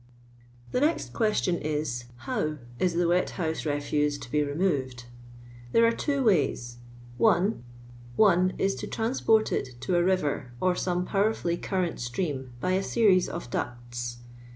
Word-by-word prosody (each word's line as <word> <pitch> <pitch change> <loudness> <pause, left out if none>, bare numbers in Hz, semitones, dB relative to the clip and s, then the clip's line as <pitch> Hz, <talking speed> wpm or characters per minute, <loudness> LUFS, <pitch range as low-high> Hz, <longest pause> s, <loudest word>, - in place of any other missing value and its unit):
Ihe - - +1
next 315 +3 +1
question, 215 -6 +1
is 150 -5 -2
— 120 - -20
Jlotv 155 +4 -1 0.2
is 180 -2 +1
the 175 0 +2
wet 180 +1 +2
house 160 -3 -2
refuse 145 0 0
to 120 - -10
be 150 - +2
removed? 145 -5 -1 0.7
There 230 - +6
.ire 230 - +5
two 280 +3 -1
ways: 135 - +1 0.2
— 120 0 -18
1. 195 - +3 0.5
One 185 - +4
is, 195 0 +1
to - - -4
transport 225 -1 +1
it 125 -2 -3
to 175 +8 0
a 175 - +3
river, 150 -9 0
or 185 0 +2
some 180 0 -1
(NiwerfuUy 195 -4 0
curn*nt 185 -3 -1
stream 130 +1 -3
by 185 - 0
a 190 +1 +2
series 195 -4 +3
of 170 -8 -6
ducti. 120 0 -4
170 Hz, 155 wpm, -27 LUFS, 130-195 Hz, 0.7 s, There